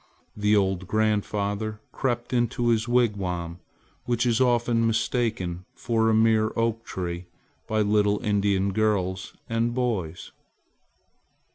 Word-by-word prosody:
The 105 0 +2
old 95 -2 +1
grandfather 105 0 -1
crept 120 -1 -2
into 120 0 +1
his 115 0 +1
wigwam, 95 -8 0 0.5
which 120 0 0
is 120 0 +2
often 120 -2 +2
mistaken 110 -6 -1
for 115 -1 +1
a - - +3
mere 110 0 +3
oak 115 0 0
tree 90 -4 -5 0.4
by 110 0 +1
little 105 0 +2
Indian 100 -2 +1
girls 95 -3 0
and 115 +1 0
boys. 105 -10 -2
110 Hz, 115 wpm, -25 LUFS, 100-115 Hz, 0.5 s, a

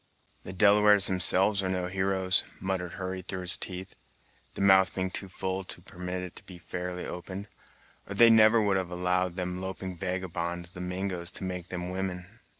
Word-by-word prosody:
"The - - -8
Delawares 105 +1 +5
themselves 95 +2 +6
are 95 - -2
no 90 -1 -1
heroes," 95 0 0 0.2
muttered 95 -2 -3
Hurry 95 0 -5
through 95 +1 -5
his 90 0 -2
teeth, 95 0 -6 0.6
the - - -4
mouth 95 -3 +5
being 95 -1 -2
too 95 - -2
full 95 0 -4
to - - -8
permit 90 +1 -6
it 90 - -8
to - - -9
be 90 - -12
fairly 90 +1 -5
opened, 95 +3 -7 0.6
"or 100 - -4
they 115 - +7
would - - +7
never 110 -2 +5
have 95 -2 -3
allowed 90 0 -1
them 90 0 -4
loping 95 -1 -5
vagabonds, 85 -1 -4
the 90 - -9
Mingos, 90 -1 -4
to - - -6
make 90 -1 -5
them 90 0 -5
women." 95 +3 -5
95 Hz, 180 wpm, -28 LUFS, 90-95 Hz, 0.6 s, they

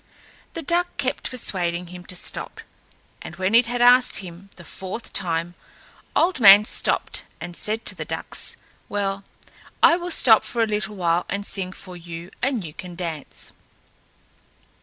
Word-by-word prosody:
The 330 - -4
duck 350 +4 0
kept 260 -2 -2
persuading 175 -8 0
him 180 0 -10
to 180 - -5
stop, - - -5 0.6
and 170 - -9
when 190 +3 -1
it 230 0 +6
had 240 0 0
asked 250 +1 +5
him 185 +1 -9
the 170 - -13
fourth 190 +7 -7
time, 170 -1 +1 0.6
Old 345 -3 +2
Man 205 -1 +9
stopped - - 0
and 175 +1 -7
said 220 +5 -2
to - - +1
the - - -6
ducks, - - -4 0.3
"Well, 200 -1 -2 0.6
I 335 - +7
will 355 0 -5
stop 225 -9 +5
for 235 -1 -1
a - - +3
little 210 0 -2
while 175 -2 0
and 200 +1 -3
sing 185 -3 -2
for 185 -1 -11
you, 170 0 -9
and 255 -5 0
you 155 -3 -8
can 180 0 -9
dance." 165 -5 -6
195 Hz, 160 wpm, -23 LUFS, 175-235 Hz, 0.6 s, Man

